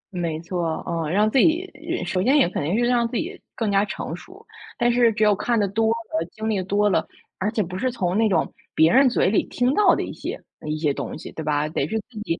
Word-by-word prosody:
没 165 -3 -2
错， 170 -2 -2
啊， 165 -3 -2
让 210 +5 +3
自 265 - +3
己 340 +6 +3 0.4
首 185 - -1
先 270 +8 +4
也 275 - +5
肯 175 - -3
定 175 +9 0
是 240 - +2
让 240 -1 +2
自 235 - -3
己 370 +4 -5
更 220 -3 -1
加 195 0 +3
成 185 -5 -5
熟。 380 - -14 0.3
但 240 -1 +2
是 240 -1 +4
只 215 0 0
有 210 -1 +5
看 235 +3 0
得 200 - +2
多 220 +3 0
了， 225 -8 -2
经 220 0 -5
历 210 -4 0
多 205 +3 +1
了， 200 - +1 0.3
而 205 +3 0
且 215 -3 0
不 180 +2 -6
是 255 +3 0
从 180 -6 -1
那 220 +1 +3
种 170 -5 0 0.2
别 160 +1 +5
人 265 +1 +6
嘴 235 - +2
里 - - +3
听 250 +2 +1
到 420 - +5
的 - - -2
一 - - -6
些 - - -6 0.3
一 155 0 -1
些 150 -2 +1
东 - - -5
西， - - -9
对 160 - -6
吧？ 150 0 0
得 150 -2 -2
是 220 - -2
自 220 - -8
己 165 - -2
210 Hz, 275 characters per minute, -23 LUFS, 170-240 Hz, 0.4 s, 人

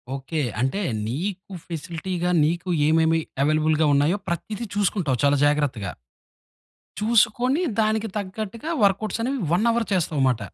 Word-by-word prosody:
Okay. 145 +4 -3 0.2
అంటే 135 +11 0 0.3
నీకు 185 - -4
ఫెసిలిటీగా, 175 +2 -3 0.2
నీకు 175 +3 -2 0.2
ఏమేమి 160 +1 +3 0.2
అవైలబుల్‌గా 155 +1 +2
ఉన్నాయో, 145 +7 +3
ప్రతిది 210 +6 -4
చూసుకుంటావు 185 -9 +1
చాలా 145 0 +4
జాగ్రత్తగా! 140 - 0 1.1
చూసుకొని 240 - +3 0.2
దానికి 220 0 0
తగ్గట్టుగా, 215 - -6
వర్క్‌అవుట్స్ 205 +3 +1
అనేవి 270 +2 -1
1 195 +6 +2
అవర్ 235 -1 0
చేస్తావమాట. 140 -9 +1
175 Hz, 115 wpm, -24 LUFS, 155-215 Hz, 1.1 s, చాలా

